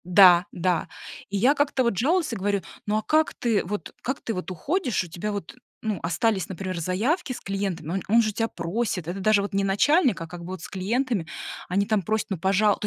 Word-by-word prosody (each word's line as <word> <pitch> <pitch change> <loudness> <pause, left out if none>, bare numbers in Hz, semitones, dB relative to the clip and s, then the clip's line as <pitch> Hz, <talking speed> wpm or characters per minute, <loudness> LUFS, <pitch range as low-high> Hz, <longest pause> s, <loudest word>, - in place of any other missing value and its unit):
Да, 180 -1 +7
да. 175 -2 0 0.4
И 200 - -1
я 250 +8 +5
как-то 285 -3 +1
вот 235 -5 0
жалуюсь, 315 - +2
и - - -2
говорю: 200 -1 0 0.3
"Ну, 210 +1 +2
а - - 0
как 310 +6 +2
ты, 230 -4 +1 0.4
как 265 +2 -3
ты 225 - -3
вот 180 -1 -4
уходишь? 255 - -1
У - - -9
тебя 175 +6 -4
вот, 200 +3 -5 0.3
ну, 215 -5 -1
остались, 190 +3 0
например, 185 -1 -4
заявки 240 - 0
с - - -7
клиентами, 195 -5 -3
он 195 - -1
он 230 +3 +5
же 215 -2 -1
тебя 225 +2 0
просит, 180 -1 -2
это 180 +3 -3
даже 205 +1 +4
вот 200 - -5
не 195 0 +1
начальник, 245 - +3
а 165 - -5
как 175 +1 -9
бы - - -8
вот 185 -3 -6
с - - -7
клиентами, 210 0 -1 0.4
они 195 +3 +2
там 215 -1 +1
просят: 215 +4 -1
"Ну, 195 - 0
пожалуйста". 195 +4 +2
200 Hz, 220 wpm, -25 LUFS, 185-235 Hz, 0.4 s, Да